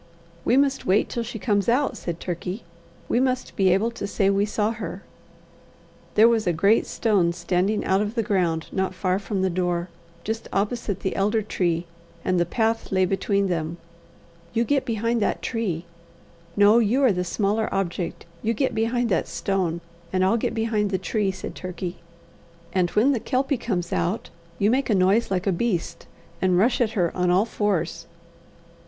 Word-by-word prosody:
"We 245 Hz, -, +3 dB
must 275 Hz, -1 st, +1 dB
wait 195 Hz, +3 st, +3 dB
till 235 Hz, -, -2 dB
she 230 Hz, 0 st, -5 dB
comes 205 Hz, -1 st, +1 dB
out," 270 Hz, +4 st, +2 dB
said 170 Hz, -1 st, -5 dB
Turkey. 180 Hz, +4 st, -4 dB, 0.4 s
"We 240 Hz, -, +2 dB
must 255 Hz, 0 st, -1 dB
be 190 Hz, -1 st, +3 dB
able 210 Hz, +6 st, +2 dB
to 230 Hz, -3 st, -5 dB
say 200 Hz, -1 st, +2 dB
we 200 Hz, +1 st, +2 dB
saw 210 Hz, +1 st, 0 dB
her." 230 Hz, 0 st, -6 dB, 1.1 s
There 220 Hz, +2 st, +7 dB
was 225 Hz, -3 st, +2 dB
a 175 Hz, -, +3 dB
great 200 Hz, +7 st, +3 dB
stone 195 Hz, -7 st, +1 dB
standing 180 Hz, +4 st, 0 dB
out 190 Hz, +1 st, +2 dB
of 210 Hz, +2 st, -2 dB
the 230 Hz, -, +1 dB
ground 180 Hz, -6 st, 0 dB
not 190 Hz, 0 st, -1 dB
far 185 Hz, 0 st, 0 dB
from 200 Hz, -1 st, -2 dB
the 190 Hz, -, +2 dB
door, 175 Hz, 0 st, -1 dB, 0.3 s
just 225 Hz, +1 st, -4 dB
opposite 205 Hz, -1 st, -1 dB
the 190 Hz, -, -2 dB
elder 210 Hz, +3 st, +1 dB
tree, 175 Hz, -4 st, -1 dB, 0.4 s
and 185 Hz, -1 st, +2 dB
the 175 Hz, -, +1 dB
path 225 Hz, +3 st, 0 dB
lay 185 Hz, -1 st, +3 dB
between 200 Hz, +1 st, +1 dB
them. 165 Hz, -2 st, -2 dB, 0.8 s
"You 230 Hz, -, +2 dB
get 275 Hz, +2 st, +1 dB
behind 230 Hz, 0 st, 0 dB
that -, -, 0 dB
tree 190 Hz, -8 st, -2 dB, 0.7 s
no, 205 Hz, +3 st, +6 dB
you 240 Hz, +5 st, +2 dB
are 255 Hz, -, +6 dB
the 180 Hz, -1 st, -1 dB
smaller 210 Hz, +4 st, 0 dB
object 180 Hz, -2 st, -2 dB, 0.2 s
you 230 Hz, +1 st, 0 dB
get 265 Hz, +5 st, 0 dB
behind 230 Hz, +2 st, +1 dB
that 190 Hz, -, +1 dB
stone, 180 Hz, -4 st, -1 dB, 0.3 s
and 185 Hz, 0 st, +2 dB
I'll 195 Hz, -, +3 dB
get 230 Hz, -, -1 dB
behind 220 Hz, -2 st, 0 dB
the 190 Hz, -, 0 dB
tree," 200 Hz, +2 st, -1 dB
said 190 Hz, -, -5 dB
Turkey; 185 Hz, 0 st, -5 dB, 0.8 s
"and 180 Hz, -2 st, +2 dB
when 245 Hz, +7 st, +5 dB
the 255 Hz, -, +1 dB
Kelpie 270 Hz, +4 st, 0 dB
comes 185 Hz, -8 st, -2 dB
out, 190 Hz, +6 st, -1 dB, 0.3 s
you 205 Hz, +2 st, +3 dB
make 265 Hz, +2 st, +1 dB
a 215 Hz, -, +4 dB
noise 195 Hz, +5 st, +3 dB
like 185 Hz, -1 st, -1 dB
a 195 Hz, -, +2 dB
beast, 180 Hz, -1 st, -2 dB, 0.3 s
and 185 Hz, -1 st, +3 dB
rush 235 Hz, +7 st, +3 dB
at 220 Hz, -2 st, +1 dB
her 175 Hz, -3 st, +1 dB
on 180 Hz, -1 st, +1 dB
all 185 Hz, +4 st, +4 dB
fours." 205 Hz, -6 st, -1 dB
200 Hz, 185 wpm, -24 LUFS, 185-225 Hz, 1.1 s, There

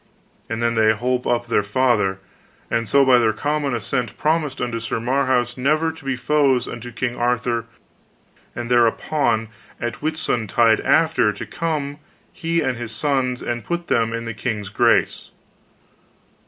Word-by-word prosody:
And 115 Hz, +1 st, -2 dB
then 115 Hz, 0 st, +2 dB
they 110 Hz, -1 st, +4 dB
holp 125 Hz, +3 st, -1 dB
up 120 Hz, 0 st, +1 dB
their 115 Hz, -, +2 dB
father, 105 Hz, -3 st, +1 dB, 0.5 s
and 115 Hz, -2 st, 0 dB
so 140 Hz, +3 st, +5 dB
by 130 Hz, -2 st, +6 dB
their 110 Hz, -2 st, +2 dB
common 145 Hz, +1 st, -1 dB
assent 120 Hz, 0 st, -3 dB
promised 155 Hz, -3 st, 0 dB
unto 120 Hz, -2 st, -2 dB
Sir 115 Hz, 0 st, -3 dB
Marhaus 125 Hz, 0 st, 0 dB
never 155 Hz, +5 st, +2 dB
to 160 Hz, -1 st, -14 dB
be 135 Hz, -1 st, -1 dB
foes 135 Hz, -1 st, +2 dB
unto 120 Hz, 0 st, -7 dB
King 120 Hz, +1 st, -3 dB
Arthur, 120 Hz, -1 st, 0 dB, 0.9 s
and 120 Hz, 0 st, -5 dB
thereupon 120 Hz, 0 st, +2 dB, 0.3 s
at 120 Hz, 0 st, -4 dB
Whitsuntide 120 Hz, -8 st, +2 dB
after, -, -, +3 dB
to -, -, -7 dB
come 150 Hz, -3 st, -3 dB, 0.3 s
he 165 Hz, 0 st, -1 dB
and 125 Hz, -2 st, -1 dB
his 120 Hz, -2 st, -5 dB
sons, 130 Hz, -3 st, 0 dB
and 120 Hz, -1 st, -3 dB
put 175 Hz, +4 st, -4 dB
them 115 Hz, -1 st, +2 dB
in 115 Hz, 0 st, -4 dB
the 115 Hz, -, -4 dB
king's 110 Hz, -3 st, -3 dB
grace. 115 Hz, +2 st, +2 dB
120 Hz, 155 wpm, -21 LUFS, 115-140 Hz, 0.9 s, by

